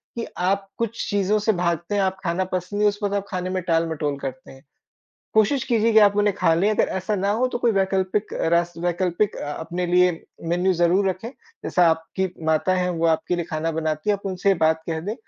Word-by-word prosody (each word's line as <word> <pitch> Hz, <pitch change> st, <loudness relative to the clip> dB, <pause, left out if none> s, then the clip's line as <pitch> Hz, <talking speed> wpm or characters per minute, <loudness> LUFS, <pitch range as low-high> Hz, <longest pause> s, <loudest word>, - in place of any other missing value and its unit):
कि 235 Hz, -, -3 dB, 0.2 s
आप 195 Hz, +1 st, 0 dB
कुछ 230 Hz, 0 st, -3 dB
चीज़ों 205 Hz, +1 st, +1 dB
से 215 Hz, +2 st, +2 dB
भागते 170 Hz, +1 st, -1 dB
हैं, 200 Hz, -, +2 dB
आप 190 Hz, 0 st, 0 dB
खाना 170 Hz, +2 st, 0 dB
पसंद 185 Hz, +3 st, -3 dB
नहीं, 210 Hz, 0 st, +5 dB
उस 205 Hz, +1 st, -6 dB
वक़्त 200 Hz, 0 st, 0 dB
आप 200 Hz, -1 st, -2 dB
खाने 185 Hz, -1 st, -3 dB
में 185 Hz, 0 st, -2 dB
टालमटोल 165 Hz, -4 st, 0 dB
करते 130 Hz, -1 st, -7 dB
हैं। 135 Hz, 0 st, -16 dB, 0.7 s
कोशिश 225 Hz, +5 st, +3 dB
कीजिए 230 Hz, -2 st, +2 dB
कि 220 Hz, -, +7 dB
आप 205 Hz, 0 st, +3 dB
उन्हें 205 Hz, -1 st, +2 dB
खा 165 Hz, -, +3 dB
लें, 180 Hz, +5 st, +2 dB
अगर 215 Hz, -, +1 dB
ऐसा 190 Hz, +3 st, -2 dB
ना 200 Hz, +1 st, 0 dB
हो 240 Hz, +4 st, +1 dB
तो 240 Hz, -, -3 dB
कोई 240 Hz, -1 st, +2 dB
वैकल्पिक 195 Hz, +1 st, 0 dB, 0.2 s
रास 170 Hz, 0 st, +2 dB
वैकल्पिक 175 Hz, +3 st, 0 dB
अ, 145 Hz, -, -4 dB
अपने 170 Hz, +4 st, -4 dB
लिए 180 Hz, 0 st, +4 dB, 0.4 s
मेनू 180 Hz, +2 st, +2 dB
ज़रूर 180 Hz, +3 st, +2 dB
रखें। 190 Hz, +5 st, -4 dB, 0.4 s
जैसा 175 Hz, -1 st, +3 dB
आपकी 165 Hz, +4 st, -2 dB, 0.2 s
माता 160 Hz, +4 st, +2 dB
है 180 Hz, 0 st, 0 dB
वो 165 Hz, -1 st, 0 dB
आपके 160 Hz, +2 st, +1 dB
लिए 170 Hz, -, -2 dB
खाना 155 Hz, +1 st, -1 dB
बनाती 155 Hz, +3 st, -1 dB
है 205 Hz, -, +2 dB
आप 200 Hz, -, -10 dB
उनसे 190 Hz, +1 st, -1 dB
ये 195 Hz, -, +5 dB
बात 160 Hz, 0 st, +2 dB
कह 160 Hz, -1 st, -2 dB
दें। 205 Hz, +6 st, -4 dB
185 Hz, 225 wpm, -23 LUFS, 170-205 Hz, 0.7 s, कि